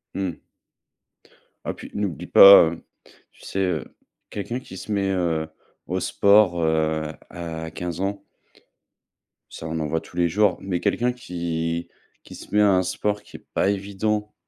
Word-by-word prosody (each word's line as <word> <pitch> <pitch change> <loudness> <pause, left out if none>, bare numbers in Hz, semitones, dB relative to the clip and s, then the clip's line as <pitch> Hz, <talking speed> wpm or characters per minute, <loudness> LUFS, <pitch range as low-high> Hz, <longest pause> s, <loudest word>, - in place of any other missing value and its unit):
Mmh. 95 -4 -3 1.3
Ah - - -2
puis - - -11
n'oublie 100 -7 -3
pas, 100 -4 +9
heu, 85 - -9 0.5
tu - - -23
sais, 95 - -4
heu, 90 -5 0 0.5
quelqu'un 120 +5 -4
qui 95 - -11
se 110 - -8
met, 100 -1 0
heu, 85 -4 0 0.4
au 95 +1 -1
sport, 100 -3 +3
heu, 80 -1 +1 0.3
à 80 -2 -6
15 90 +1 -5
ans 100 +1 -3 1.3
ça, - - -9
on 80 0 -3
en 75 - -2
voit 80 +2 -1
tous - - -16
les 85 -1 +2
jours, 100 +1 +2
mais 95 -3 -2
quelqu'un 125 +6 +1
qui 85 -6 -4 0.3
qui - - -12
se - - -12
met 105 - +4
à 105 - +5
un 95 -1 +3
sport 105 +3 -2
qui - - -12
est - - -23
pas - - +2
évident, 100 +2 -2
90 Hz, 165 wpm, -23 LUFS, 85-100 Hz, 1.3 s, pas